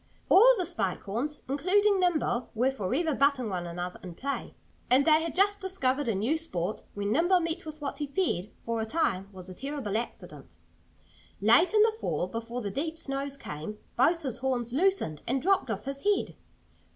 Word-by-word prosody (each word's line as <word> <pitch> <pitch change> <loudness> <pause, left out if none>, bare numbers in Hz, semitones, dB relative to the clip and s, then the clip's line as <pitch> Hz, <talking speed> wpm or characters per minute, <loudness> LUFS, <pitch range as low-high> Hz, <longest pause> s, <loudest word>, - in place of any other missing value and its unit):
All - - +8
the 365 - 0
Spike 310 - -2
Horns, 245 +10 -3
including 380 +9 +3
Nimble, 310 -9 +1
were 250 +4 +2
forever 270 - -1
butting 275 -4 +2
one 180 -3 -3
another 175 +1 -5
in 180 -2 -9
play. 280 +7 -4 0.3
And 265 +3 +5
they 315 0 +5
had 330 0 -4
just 405 +2 +3
discovered 290 -8 0
a 225 - +1
new 240 +12 +1
sport 200 - -3
when 205 0 -2
Nimble 350 +8 +4
met 330 -1 -3
with 310 0 -8
what 285 - -4
he 295 - -2
feared, 275 - -1 0.2
for 230 -1 -1
a - - -1
time, 200 - 0
was 185 -2 -10
a 185 - -8
terrible 270 -2 -4
accident. 235 - -7 0.8
Late 235 - +5
in 425 - +7
the 445 0 +3
fall, - - -1
before 230 +5 -5
the 200 -3 -3
deep 315 +8 -2
snows 275 -2 -3
came, 155 - -7 0.2
both 335 0 +3
his 255 -4 -2
horns 245 -2 -1
loosened 330 - +1
and 265 +3 +1
dropped 380 -3 +2
off 210 -2 -3
his 275 0 -4
head. 410 0 +1
275 Hz, 190 wpm, -28 LUFS, 215-330 Hz, 0.8 s, All